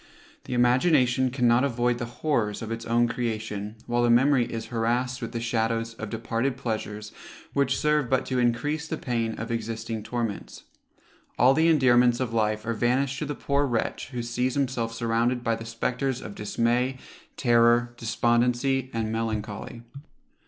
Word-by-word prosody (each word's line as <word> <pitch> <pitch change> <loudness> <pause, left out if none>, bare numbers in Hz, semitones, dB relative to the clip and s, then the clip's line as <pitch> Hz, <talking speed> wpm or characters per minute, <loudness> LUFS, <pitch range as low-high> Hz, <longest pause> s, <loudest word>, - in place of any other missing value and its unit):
The 130 - -3
imagination 125 +1 +3
cannot 125 -1 +3
avoid 120 -2 0
the 120 - -3
horrors 120 -5 -1
of 115 - -6
its 115 0 -5
own 120 +1 +3
creation, 110 -3 -3
while 120 0 0
the 120 - +3
memory 125 0 +4
is 115 -1 -5
harrassed 120 +2 0
with - - -4
the 115 - -3
shadows 115 0 -1
of 105 -2 -7
departed 115 +3 -2
pleasures, 105 -4 -4 0.4
which 140 -2 +1
serve 150 -4 +1
but 130 -1 +1
to 130 -1 -1
encrease 145 +6 0
the 160 - -3
pain 115 -5 -2
of 115 +1 -5
existing 115 0 -3
torments. 115 -1 -4 0.7
All 130 +2 +6
the 160 +4 +3
endearments 125 -6 +4
of 125 -3 -2
life 110 -1 0
are 115 - -1
vanished 125 +4 0
to - - -3
the 145 - -3
poor 140 +1 0
wretch 120 -3 -2
who 125 -3 -4
sees 125 +2 -1
himself 125 -5 -1
surrounded 115 +2 0
by 115 - +1
the 115 0 -8
spectres 125 +3 -2
of 105 - -8
dismay, 120 +5 0 0.4
terror, 120 -1 +4
despondency, 120 +3 +1
and 110 -1 -1
melancholy. 110 0 -4
120 Hz, 160 wpm, -26 LUFS, 115-130 Hz, 0.7 s, All